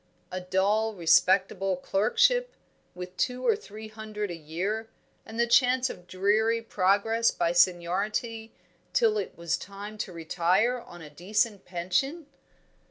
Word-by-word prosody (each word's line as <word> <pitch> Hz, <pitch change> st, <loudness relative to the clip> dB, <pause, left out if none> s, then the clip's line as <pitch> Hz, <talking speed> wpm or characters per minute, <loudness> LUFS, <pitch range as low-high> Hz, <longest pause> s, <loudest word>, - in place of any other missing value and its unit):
A 185 Hz, 0 st, -4 dB
dull, 205 Hz, +4 st, +1 dB
respectable 190 Hz, +2 st, +3 dB
clerkship, 480 Hz, -, +2 dB, 0.4 s
with 180 Hz, 0 st, -8 dB
two 250 Hz, 0 st, -1 dB
or 450 Hz, -, +4 dB
three 220 Hz, -, -10 dB
hundred 215 Hz, -2 st, -5 dB
a -, -, -4 dB
year, 185 Hz, +8 st, -4 dB, 0.4 s
and 225 Hz, +1 st, -7 dB
the 235 Hz, -, +4 dB
chance 250 Hz, +1 st, +3 dB
of 180 Hz, -, -13 dB
dreary 210 Hz, +5 st, +1 dB
progress 225 Hz, +2 st, +2 dB
by 170 Hz, -, 0 dB
seniority 195 Hz, +6 st, 0 dB, 0.4 s
till 450 Hz, -3 st, +3 dB
it -, -, -6 dB
was 170 Hz, -4 st, -1 dB
time 205 Hz, +2 st, -9 dB
to 190 Hz, -, -4 dB
retire 180 Hz, +8 st, +1 dB
on 175 Hz, -7 st, -12 dB
a 150 Hz, -, -10 dB
decent 205 Hz, +5 st, -1 dB
pension? 185 Hz, -, -2 dB
205 Hz, 135 wpm, -27 LUFS, 180-230 Hz, 0.4 s, or